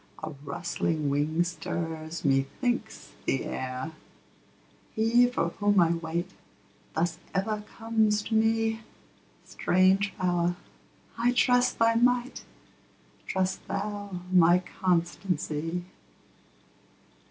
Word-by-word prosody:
a 155 - -3
rustling 155 -2 -2
wing 155 +4 +1
stirs, 165 -2 -4
methinks, 180 - -1 0.2
the 135 - 0
air: 130 +4 -4 1.0
He 235 +3 +4
for 245 -8 0
whom 205 +2 +2
I 170 -1 +5
wait, 170 +2 -3 0.6
thus 165 +1 0 0.2
ever 210 +2 0 0.2
comes 220 -2 +2
to 225 - -5
me; 225 0 +2 0.7
Strange 190 +2 +2
Power! 175 -2 +1 0.6
I 245 +1 +3
trust 245 0 +3
thy 230 0 +4
might; 245 +2 +1 0.8
trust 190 0 -1
thou 205 -2 -4
my 175 0 +6 0.2
constancy. 175 -2 -1
185 Hz, 95 wpm, -28 LUFS, 165-220 Hz, 1.0 s, my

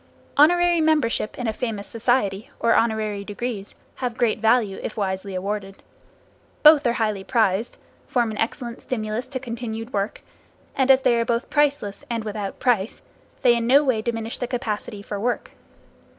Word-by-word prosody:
Honorary 345 +3 +5
membership 300 -9 +1
in 250 - -3
a 220 - 0
famous 215 -4 -4
society, 225 -4 0
or 230 0 +3
honorary 215 -3 +1
degrees, 205 0 -5 0.2
have 245 -3 -3
great 230 -2 +1
value 220 -3 +2
if 215 - -6
wisely 190 -1 -2
awarded. 195 +1 -4 0.8
Both 300 -3 +8
are 235 - +2
highly 215 -4 -1
prized, 220 -1 +1 0.3
form 240 -3 +1
an 215 - -6
excellent 235 +1 -3
stimulus 220 0 -3
to 260 0 -4
continued 230 -1 -6
work, 200 0 -2 0.5
and 265 -1 +1
as 265 0 +6
they 240 - +4
are - - +2
both 235 +1 -2
priceless, 285 -9 +1
and 230 -2 -2
without 210 -2 -4
price, 230 -5 0 0.4
they 245 -2 +6
in 235 0 -1
no 280 +4 +6
way 255 -6 +1
diminish 225 0 -3
the 245 - -2
capacity 215 -4 -4
for 205 0 -5
work. 240 +4 -2
230 Hz, 165 wpm, -23 LUFS, 210-250 Hz, 0.8 s, Both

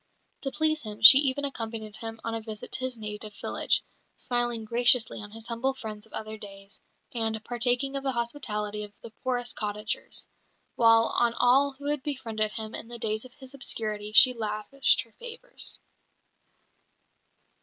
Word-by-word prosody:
To 270 - -2
please 310 +1 0
him, 215 -3 -8
she 265 +4 +12
even 285 0 +1
accompanied 225 -5 -5
him 225 0 -6
on 230 - -4
a 225 - -4
visit 215 -1 -9
to - - -2
his 255 -1 -2
native 210 -1 -5
village, - - +1 0.3
smiling 240 -2 -1
graciously 240 0 +5
on 205 - -7
his 225 +1 -8
humble 250 +3 -1
friends 215 -3 -8
of - - -24
other 220 0 -5
days, 195 -1 -11 0.3
and 225 -2 -2
partaking 245 +3 0
of 275 - -2
the 270 -1 -2
hospitality 210 -4 -3
of 205 -1 -10
the 230 - -10
poorest 245 -2 -1
cottagers; 210 0 -4 0.5
while 225 -1 +4
on 235 -1 +1
all 270 +3 +3
who 280 +1 -13
had 295 -1 -1
befriended 225 -7 -2
him 220 -1 -3
in - - -6
the 240 0 -6
days 220 0 -2
of 255 - -15
his 265 -1 -11
obscurity 215 -6 -3
she 250 +4 +8
lavished 220 +4 +2
her 230 - -24
favours. 485 +1 -5
230 Hz, 165 wpm, -27 LUFS, 215-260 Hz, 0.5 s, she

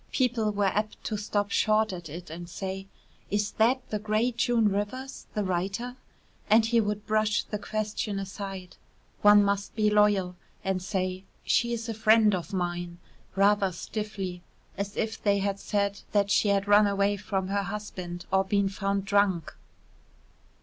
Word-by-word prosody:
People 240 -4 +1
were 205 -1 0
apt 210 +2 -1
to 215 - -2
stop 205 -1 -1
short 215 -1 +2
at 175 -3 -7
it 170 +2 -8
and 170 +1 -7
say: 190 +1 -5 0.4
"Is 205 0 0
that 250 +4 +3
the 210 - -1
great 215 +3 0
June 240 -2 +2
Rivers, 210 +7 -4
the 210 - 0
writer?" 195 +7 -2 0.5
And 220 +1 +6
he 230 0 +3
would 210 0 -3
brush 215 0 +1
the 210 - -5
question 215 0 -3
aside 195 -2 -6 0.4
one 205 0 +7
must 200 0 -1
be 215 -1 +2
loyal 205 -3 +3 0.3
and 190 -1 -1
say: 185 0 -2 0.2
"She 235 0 +2
is 230 -1 -3
a 225 - -2
friend 220 -1 +5
of 180 +1 -3
mine," 175 -2 -3 0.4
rather 200 0 +3
stiffly, 195 -1 -5 0.3
as 200 +1 -4
if 220 0 -2
they 200 -1 +3
had 200 0 -1
said 200 -1 -1
that 200 -1 +2
she 210 - +3
had 200 0 +2
run 205 0 +6
away 200 0 +1
from 195 -2 -3
her 200 0 +1
husband 185 -3 -6
or 190 0 +4
been 200 0 +1
found 195 0 -2
drunk. 200 -5 +1
205 Hz, 165 wpm, -28 LUFS, 195-215 Hz, 0.5 s, one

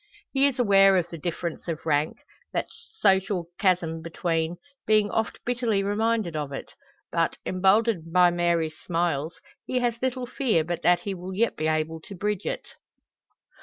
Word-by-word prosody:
He 275 +1 +4
is 275 - -2
aware 195 -5 +6
of 175 -2 0
the 170 - -6
difference 170 +1 -4
of 165 -2 -4
rank 150 0 0 0.3
that - - 0 0.3
social 190 - +2
chasm 175 -5 +1
between 165 0 -2 0.3
being 215 -1 +3
oft 225 -1 -1
bitterly 235 -5 0
reminded 210 -3 0
of 150 -2 -3
it; 135 - -7 0.4
but, - - 0
emboldened 190 -2 +2
by 180 0 +5
Mary's 170 -2 0
smiles, 165 -2 -1 0.3
he 255 - -2
has 240 -2 0
little 255 -1 -1
fear 240 - +1
but 175 +1 -3
that 175 +1 +4
he 200 - -3
will 185 +1 -7
yet 230 +4 +1
be 155 - -1
able 155 +1 -1
to 195 - -10
bridge 205 +1 -2
it. - - -3
180 Hz, 165 wpm, -26 LUFS, 165-215 Hz, 0.4 s, aware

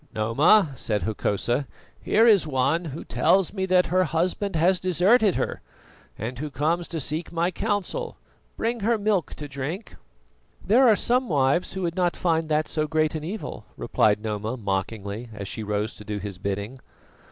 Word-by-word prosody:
"Noma," 140 - +4
said 105 -3 -1
Hokosa, 120 +5 -1 0.3
"here 225 +2 +3
is 205 -8 +5
one 150 +5 +1
who 155 0 -6
tells 190 -2 +2
me 190 -2 -2
that 185 -1 +4
her 185 0 +4
husband 175 +5 -1
has 180 +3 +3
deserted 185 - +3
her, - - -2 0.6
and 120 +3 -5
who 150 +1 -4
comes 160 +5 -1
to 165 - -4
seek 155 +4 -3
my 170 +2 0
counsel. 215 - -2 0.4
Bring 235 +1 -1
her 225 +2 +1
milk 205 -4 0
to 145 - -7
drink." 145 +9 -6 0.7
"There 245 +7 +5
are 220 - +6
some 250 +3 +1
wives 140 +3 +1
who 190 -1 -4
would 170 -1 -2
not 180 -2 +1
find 165 -2 0
that 155 0 +1
so 155 -1 -1
great 155 0 +1
an 155 -1 -4
evil," 195 +7 -6
replied 105 0 +1
Noma 110 +3 -3
mockingly, 100 +2 -3
as 100 -1 -6
she 110 - -5
rose 105 +1 -2
to - - -10
do 105 0 -4
his 100 -2 -6
bidding. 100 +6 -4
160 Hz, 175 wpm, -25 LUFS, 115-185 Hz, 0.7 s, are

